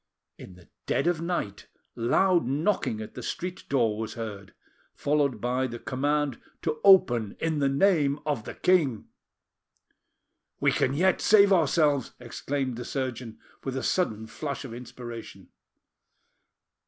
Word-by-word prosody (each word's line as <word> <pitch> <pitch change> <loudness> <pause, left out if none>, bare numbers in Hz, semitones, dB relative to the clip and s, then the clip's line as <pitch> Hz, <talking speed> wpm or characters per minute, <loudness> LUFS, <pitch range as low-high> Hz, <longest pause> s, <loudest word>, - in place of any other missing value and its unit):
In 90 - -11
the 90 -1 -18 0.2
dead - - +1
of 175 -2 +1
night 165 - -3 0.3
loud 175 +7 +2
knocking 140 - 0
at 110 - -8
the - - -7
street 180 +1 -5
door 115 -6 +1
was 110 0 -5
heard, 105 -4 -7 0.4
followed 145 -2 +1
by 125 +2 0
the 120 -1 -6
command 145 +1 -1 0.2
to 155 -2 -2
open 120 - +5
in 160 -2 -1
the 140 -1 +2
name 145 -2 +2
of 145 -8 -2
the - - -7
king. 150 - +1 1.5
"We - - +3
can 135 - +1
yet 185 +4 +2
save 200 -2 +6
ourselves!" 150 -5 +2
exclaimed 125 0 -3
surgeon, 125 -4 -4 0.3
with 135 -1 -3
a 130 - -3
sudden 110 - 0
flash 140 +4 -5
of 120 - -8
inspiration. 120 -1 -9
135 Hz, 135 wpm, -27 LUFS, 115-155 Hz, 1.5 s, save